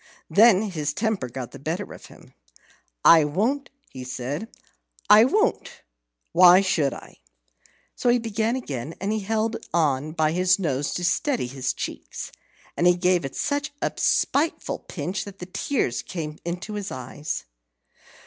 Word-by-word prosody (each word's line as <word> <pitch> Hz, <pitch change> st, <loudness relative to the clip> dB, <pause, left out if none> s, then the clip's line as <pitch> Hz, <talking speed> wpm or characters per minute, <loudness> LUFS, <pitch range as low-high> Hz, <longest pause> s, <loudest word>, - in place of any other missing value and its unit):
Then 215 Hz, -2 st, +6 dB
his 150 Hz, -3 st, -2 dB
temper 215 Hz, -, -1 dB
got 125 Hz, 0 st, -6 dB
the -, -, -11 dB
better 165 Hz, +8 st, -4 dB
of -, -, -12 dB
him. -, -, -17 dB, 0.7 s
"I 165 Hz, -2 st, +8 dB
won't," 225 Hz, -, -1 dB, 0.2 s
he 130 Hz, -, -8 dB
said, 130 Hz, -, -4 dB, 0.6 s
"I 215 Hz, +2 st, +9 dB
won't; 430 Hz, -, 0 dB, 0.5 s
why 180 Hz, +1 st, +8 dB
should 160 Hz, -7 st, +1 dB
I?" -, -, -11 dB, 0.8 s
So 245 Hz, -, 0 dB
he 240 Hz, -, +5 dB
began 225 Hz, 0 st, -1 dB
again. 150 Hz, -, -5 dB
He 210 Hz, +3 st, -1 dB
held 220 Hz, +2 st, -1 dB, 0.2 s
on 150 Hz, -2 st, +1 dB
by 155 Hz, -2 st, +1 dB
his 185 Hz, +2 st, +3 dB
nose 145 Hz, -7 st, -1 dB
to 180 Hz, -, -3 dB
steady 275 Hz, -, 0 dB
his 130 Hz, +1 st, -2 dB
cheeks, -, -, -6 dB, 0.4 s
and 175 Hz, -, +2 dB
he 180 Hz, -, +6 dB
gave 180 Hz, -1 st, +2 dB
it 135 Hz, -, -6 dB
such 285 Hz, +1 st, -2 dB
a -, -, -1 dB
spiteful 310 Hz, +4 st, +1 dB
pinch 185 Hz, +3 st, -4 dB
that 200 Hz, -1 st, -10 dB
the 180 Hz, -, -7 dB
tears 185 Hz, -, -1 dB
came 155 Hz, -4 st, -6 dB
into 180 Hz, +5 st, -5 dB
his 205 Hz, -1 st, -4 dB
eyes. 130 Hz, +4 st, -5 dB
180 Hz, 150 wpm, -24 LUFS, 150-220 Hz, 0.8 s, I